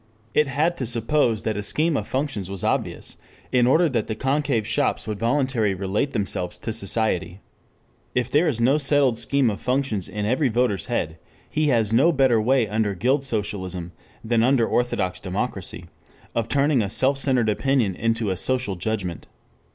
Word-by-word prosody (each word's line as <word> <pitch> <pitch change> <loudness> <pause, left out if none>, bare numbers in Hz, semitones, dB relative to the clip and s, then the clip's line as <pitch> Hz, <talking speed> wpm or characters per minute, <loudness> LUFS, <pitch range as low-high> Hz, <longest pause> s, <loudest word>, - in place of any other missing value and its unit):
It 150 - +3
had 155 +6 0
to 130 - -1
suppose 115 -1 +1
that 110 - -1
a - - -2
scheme 155 +9 +2
of - - -2
functions 130 -9 -3
was 95 -1 -6
obvious - - -2 0.3
in 125 -1 +3
order 165 +7 +4
that 120 -7 -1
the 110 - -3
concave 135 -2 0
shops 140 +3 0
would 105 -2 -4
voluntarily 120 -4 +1
relate 100 +9 -1
themselves 100 -5 -1
to 115 - -4
society. 100 -3 0 0.8
If 125 -1 0
there 150 +5 +3
is 125 -7 -1
no 135 +6 +3
settled 140 -3 +2
scheme 130 0 +1
of 100 - -7
functions 125 -7 -1
in 105 -1 -4
every 130 +5 +1
voter's 115 -5 0
head, 80 +1 -2 0.3
he 155 0 0
has 115 -5 +2
no 140 +9 +5
better 130 -7 +3
way 125 0 +2
under 105 -1 -1
guild 130 +9 +1
socialism 95 -7 -3 0.3
than 115 0 +1
under 125 -1 +3
orthodox 110 -7 -1
democracy 95 +1 -4 0.5
of 115 -1 -1
turning 140 -2 +2
a 100 - -2
self 135 +6 +2
centered 130 -5 +2
opinion 110 -1 +1
into 115 +1 -1
a 95 - -2
social 125 -1 +1
judgment. 95 -3 -4
115 Hz, 175 wpm, -23 LUFS, 105-135 Hz, 0.8 s, no